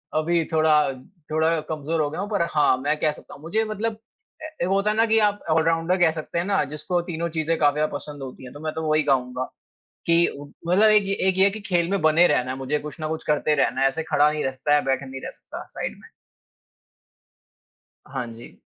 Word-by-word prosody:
अभी 165 +2 +2
थोड़ा 155 -1 +3 0.6
थोड़ा 160 +1 +2
कमज़ोर 155 +1 -1
हो 145 - 0
गया 160 +6 -5
हूँ। 205 - -4
पर 205 -5 0
हाँ, 150 -4 +3
मैं 145 +4 0
कह 155 - +2
सकता - - -13
हूँ - - -13
मुझे 175 +8 0
मतलब 215 +1 -3 0.5
ए 315 - -4 0.2
एक - - +1
होता 195 +2 +2
है - - -2
ना 225 - +5
कि 225 0 +3
आप 205 -1 +2
ऑलराउंडर 165 +3 +2
कह 175 -3 +4
सकते 160 +1 -5
हैं 170 - -1
ना, 200 0 +2
जिसको 175 +4 -2
तीनों 170 +1 -2
चीज़ें 160 +1 -1
काफ़ी 145 -2 +4
ज़्यादा 155 +1 0
पसंद 145 -2 -7
होती 130 0 -9
हैं, 125 - -10
तो 145 - -10
मैं 155 0 -4
तो 160 - -4
वही 155 0 +3
कहूँगा 125 -1 0 0.6
कि 170 0 +4 0.4
मतलब 200 +5 +5
एक 215 -1 +5 0.2
एक 190 0 +1
ये 190 - +5
है 200 - +6
कि 215 - -7
खेल 175 -4 0
में 200 -3 0
बने 160 +3 +5
रहना 130 -3 +1
है 130 - -5
मुझे, 135 +3 -1
कुछ 150 -1 -8
न 155 - -1
कुछ 160 0 -4
करते 150 0 +2
रहना 135 -2 +1
है। 135 - +5
ऐसे 160 +4 -2
खड़ा 150 -1 +3
नहीं 150 0 -2
रह 135 - 0
सकता 135 +3 -3
है - - +7
या - - +1
बैठा 135 0 0
नहीं 130 0 -8
रह - - -5
सकता - - -10
साइड - - -5
में। - - -15 2.0
हाँ 135 -2 -4
जी। 115 +1 -13
160 Hz, 235 wpm, -24 LUFS, 145-175 Hz, 2.0 s, है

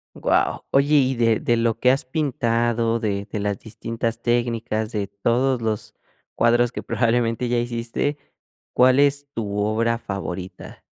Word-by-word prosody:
Wao. - - 0
Oye 140 +2 +3
y 135 -2 +3
de 115 -2 +2
de 120 - +1
lo 115 -1 +1
que 125 - +5
has 135 - 0
pintado, 120 -4 0
de 100 -3 -2
de 105 - -3
las 100 -1 -2
distintas 115 +1 -4
técnicas, 115 -2 -1
de 105 -3 -2
todos 120 +6 0
los 110 -2 -3 0.4
cuadros 120 0 +3
que - - -5
probablemente 115 +1 0
ya 120 0 +1
hiciste, 120 +4 -2 0.6
¿cuál 130 +1 +5
es 145 0 +2
tu 105 -3 -3
obra 110 +3 +1
favorita? 95 -3 -7
115 Hz, 150 wpm, -22 LUFS, 110-125 Hz, 0.6 s, que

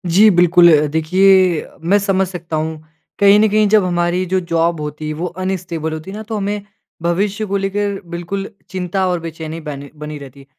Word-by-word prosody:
जी 215 +2 +7
बिल्कुल। 175 -1 +5
अ, 150 - +1
देखिए 185 +3 +3 0.2
मैं 205 +1 +5
समझ 195 -1 +1
सकता 170 -3 -6
हूँ। 155 0 -3 0.4
कहीं 200 +1 +6
न 220 - +5
कहीं 215 0 +3
जब 215 -2 +4
हमारी 175 0 0
जो 190 - +3
जॉब 170 -1 0
होती 150 +1 -5
है 155 - -3
वो 165 +4 -4 0.2
अनस्टेबल 170 -4 -3
होती 160 +4 -7
है 205 - -7
ना, 220 - -6
तो 220 0 -4
हमें 205 +1 -2 0.4
भविष्य 200 +5 -1
को 200 0 -1
लेकर 200 0 -2
बिल्कुल 175 +4 -4 0.2
चिंता 185 +1 -2
और 180 -1 0
बेचैनी 160 0 -7
बन 140 -2 -7
बनी 150 0 -6
रहती 140 -1 -12
है। 135 - -15
180 Hz, 200 wpm, -17 LUFS, 160-195 Hz, 0.4 s, जी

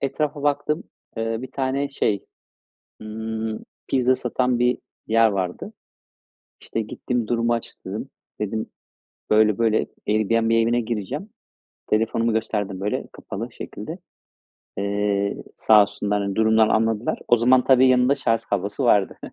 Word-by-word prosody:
etrafa 145 +1 -2
baktım. 150 +2 0 0.3
Eee, 115 0 -1
bir 130 - -7
tane, 135 +1 -1
şey, 110 -7 -1 0.8
ımm, 110 0 -4 0.2
pizza 130 -1 +3
satan 125 0 0
bir 125 +1 +2 0.3
yer 115 0 +4
vardı. 95 -3 -3 0.9
İşte, 115 - -3
gittim 115 +2 -3
durumu 120 0 +1
açıkladım. 115 - -5 0.3
Dedim, 110 +1 -2 0.7
böyle 105 -1 +4
böyle, 115 -2 +2 0.2
Airbnb 115 +2 +2
evine 115 +1 +3
gireceğim. 120 - -4 0.6
Telefonumu 115 +1 +1
gösterdim, 105 -4 -2
böyle, 105 - -2
kapalı - - -7
şekilde, - - -7 0.8
eee, 100 0 0 0.2
sağ 105 -1 +6
olsunlar, 105 0 -1
hani, 100 -1 -2
durumdan 110 0 +4
anladılar. 115 0 +1
O 120 - +6
zaman, 125 +2 +4
tabii, 130 -1 +6
yanında 130 +1 +4
şarj 115 -4 0
kablosu 100 +6 -2
vardı. 105 -5 +3
115 Hz, 125 wpm, -23 LUFS, 105-125 Hz, 0.9 s, sağ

